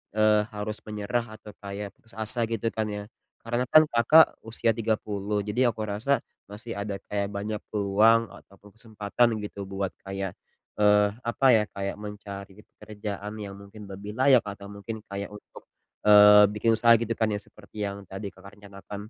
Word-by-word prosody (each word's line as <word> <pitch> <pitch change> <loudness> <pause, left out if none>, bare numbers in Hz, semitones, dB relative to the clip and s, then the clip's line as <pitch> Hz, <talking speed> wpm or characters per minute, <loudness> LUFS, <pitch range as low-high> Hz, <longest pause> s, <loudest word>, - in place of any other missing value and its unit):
eee, 105 -1 +4
harus 105 +1 -4
menyerah 110 +2 -3
atau 110 -1 -12
kayak 100 0 -6
putus 115 - -18
asa 110 +2 +1
gitu 115 0 -2
kan 110 -1 -2
ya. 105 0 -5 0.4
Karena 120 +2 -1
kan 155 +4 +7
Kakak 125 +8 +5
usia 115 0 0
30, 105 -2 -1
jadi 120 +5 +1
aku 110 - -7
rasa 115 +6 0 0.3
masih 105 +2 -7
ada 100 0 -3 0.2
kayak 100 -1 0
banyak 105 +2 -3 0.2
peluang 105 +2 +3
ataupun 100 +1 -17
kesempatan 110 0 0
gitu 100 -1 -6
buat 95 0 -3 0.2
kayak, 95 -1 -5 0.4
eee, 105 0 +5 0.2
apa 120 +3 -1
ya, 110 -3 +5
kayak 100 0 -4
mencari 100 -1 -9 0.2
pekerjaan 105 -1 -7
yang 100 -1 -7
mungkin 100 +1 -12
lebih 100 +2 -8
layak 130 0 +4
atau 100 -1 -8
mungkin 100 +2 -7
kayak 100 +1 -6
untuk, 105 - -14 0.4
eee, 105 0 +9
bikin 110 +1 +2
usaha 115 +1 +6
gitu 115 0 -2
kan 110 -2 +1
ya 100 - -3
seperti 105 0 -12
yang 100 0 -9
tadi 95 +2 -7
Kakak 95 +1 -15
rencanakan. 100 +1 -10
105 Hz, 165 wpm, -26 LUFS, 100-110 Hz, 0.4 s, eee